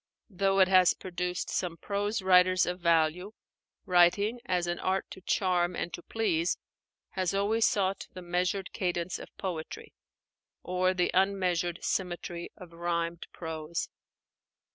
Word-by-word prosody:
Though 195 Hz, +1 st, +1 dB
it 190 Hz, -, +7 dB
has 185 Hz, -1 st, +5 dB
produced 180 Hz, -1 st, -3 dB
some 175 Hz, -2 st, -2 dB
prose 205 Hz, +3 st, -2 dB
writers 185 Hz, 0 st, +5 dB
of 180 Hz, +1 st, -3 dB
value, 170 Hz, +3 st, +2 dB, 0.5 s
writing, 190 Hz, +6 st, +4 dB
as 180 Hz, -1 st, +1 dB
an 175 Hz, 0 st, -2 dB
art 190 Hz, +1 st, 0 dB
to 190 Hz, -, -9 dB
charm 180 Hz, -2 st, +1 dB
and 175 Hz, -, -4 dB
to -, -, -6 dB
please, 180 Hz, -6 st, 0 dB, 0.5 s
has 185 Hz, 0 st, -1 dB
always 215 Hz, +3 st, +3 dB
sought 195 Hz, -1 st, 0 dB
the 185 Hz, -, -9 dB
measured 180 Hz, +2 st, -1 dB
cadence 175 Hz, -1 st, -2 dB
of -, -, -10 dB
poetry 170 Hz, -5 st, -5 dB, 0.7 s
or 185 Hz, +1 st, +1 dB
the 180 Hz, -1 st, +1 dB
unmeasured 180 Hz, -3 st, +1 dB
symmetry 175 Hz, -2 st, -3 dB
of 175 Hz, -2 st, -12 dB
rhymed 170 Hz, 0 st, -2 dB
prose. 160 Hz, 0 st, -4 dB
180 Hz, 135 wpm, -29 LUFS, 175-190 Hz, 0.7 s, it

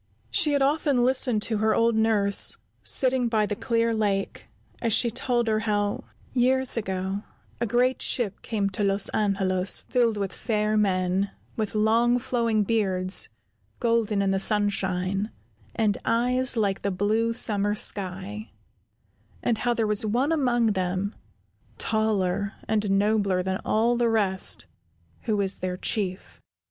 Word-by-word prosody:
She 325 Hz, -7 st, +3 dB
had 280 Hz, -1 st, +2 dB
often 280 Hz, -3 st, +2 dB
listened 250 Hz, -4 st, +3 dB
to 220 Hz, -2 st, -1 dB
her 220 Hz, 0 st, +2 dB
old 230 Hz, 0 st, +2 dB
nurse, 215 Hz, -3 st, +2 dB, 0.2 s
sitting 255 Hz, -2 st, +2 dB
by 220 Hz, -2 st, +1 dB
the 205 Hz, -, -3 dB
clear 230 Hz, +1 st, 0 dB
lake, 205 Hz, -3 st, -2 dB, 0.3 s
as 230 Hz, -2 st, 0 dB
she 235 Hz, +2 st, +3 dB
told 240 Hz, 0 st, -1 dB
her 215 Hz, -1 st, +1 dB
how, 205 Hz, -1 st, -1 dB, 0.3 s
years 260 Hz, +1 st, +1 dB
ago, 190 Hz, -2 st, -3 dB, 0.4 s
a 235 Hz, -, -1 dB
great 250 Hz, +3 st, +1 dB
ship 210 Hz, -6 st, -1 dB
came 205 Hz, -3 st, -2 dB
to 200 Hz, +2 st, -2 dB
Los 195 Hz, 0 st, +1 dB
Angelos 195 Hz, -2 st, +1 dB
filled 235 Hz, -4 st, 0 dB
with 195 Hz, -2 st, -3 dB
fair 215 Hz, -2 st, -1 dB
men, 190 Hz, -1 st, +1 dB, 0.3 s
with 215 Hz, -1 st, -3 dB
long 230 Hz, +3 st, +3 dB
flowing 235 Hz, -4 st, 0 dB
beards, 190 Hz, -3 st, +1 dB, 0.5 s
golden 225 Hz, -3 st, +1 dB
in 195 Hz, -, +1 dB
the 195 Hz, -, +1 dB
sunshine, 195 Hz, -1 st, 0 dB, 0.5 s
and 215 Hz, -3 st, 0 dB
eyes 250 Hz, +2 st, +1 dB
like 200 Hz, -3 st, 0 dB
the 200 Hz, -, -1 dB
blue 210 Hz, +4 st, 0 dB
summer 205 Hz, -3 st, +1 dB
sky, 200 Hz, +1 st, -1 dB, 0.9 s
and 230 Hz, -2 st, 0 dB
how 240 Hz, -1 st, 0 dB
there 225 Hz, -, 0 dB
was 210 Hz, 0 st, +1 dB
one 245 Hz, +8 st, 0 dB
among 240 Hz, -7 st, +2 dB
them, 190 Hz, +2 st, -2 dB, 0.6 s
taller 205 Hz, -2 st, 0 dB
and 210 Hz, -2 st, 0 dB
nobler 200 Hz, -2 st, +1 dB
than 190 Hz, +1 st, -3 dB
all 230 Hz, +3 st, +1 dB
the 235 Hz, -1 st, +1 dB
rest, 195 Hz, -, +1 dB, 0.6 s
who 215 Hz, -2 st, 0 dB
was 195 Hz, -1 st, 0 dB
their 180 Hz, 0 st, -3 dB
Chief. 190 Hz, -1 st, -3 dB
215 Hz, 145 wpm, -25 LUFS, 195-235 Hz, 0.9 s, She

